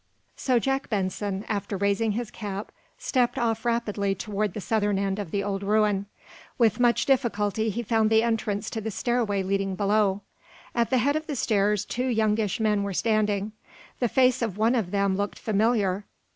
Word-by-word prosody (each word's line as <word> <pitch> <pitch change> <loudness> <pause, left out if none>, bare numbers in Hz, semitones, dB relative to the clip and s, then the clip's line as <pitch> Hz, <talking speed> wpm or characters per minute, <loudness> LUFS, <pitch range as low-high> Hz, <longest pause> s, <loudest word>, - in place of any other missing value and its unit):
So 255 -2 +1
Jack 270 +3 -1
Benson, 195 0 -2
after 200 -1 -2
raising 200 +2 +1
his 235 0 -4
cap, 205 -1 -6 0.3
stepped 250 -3 0
off 225 -2 0
rapidly 210 -4 0
toward 210 0 -2
the - - -3
southern 205 -1 0
end 195 0 -1
of 200 -5 -4
the 200 +4 -1
old 195 -1 -2
ruin. 205 -1 +1 0.5
With 230 -1 +3
much 240 -1 +3
difficulty 220 -5 +1
he 235 +3 -3
found 220 -1 +2
the 220 0 +4
entrance 220 -2 -1
to 220 - -3
the 220 - -3
stairway 220 -3 0
leading 195 0 -1
below. 205 0 +1 0.5
At 235 -1 +1
the 260 - +3
head 280 +4 +2
of 310 0 -3
the 295 - -3
stairs 210 -3 +1
two 250 +2 -2
youngish 220 -3 +1
men 210 -2 +2
were 200 -2 -3
standing. 210 -1 +1 0.5
The 245 - +1
face 255 0 +3
of 220 -5 -2
one 225 +3 +3
of 225 -8 0
them 200 0 +1
looked 205 0 -2
familiar. 210 -2 +1
210 Hz, 180 wpm, -26 LUFS, 200-230 Hz, 0.5 s, the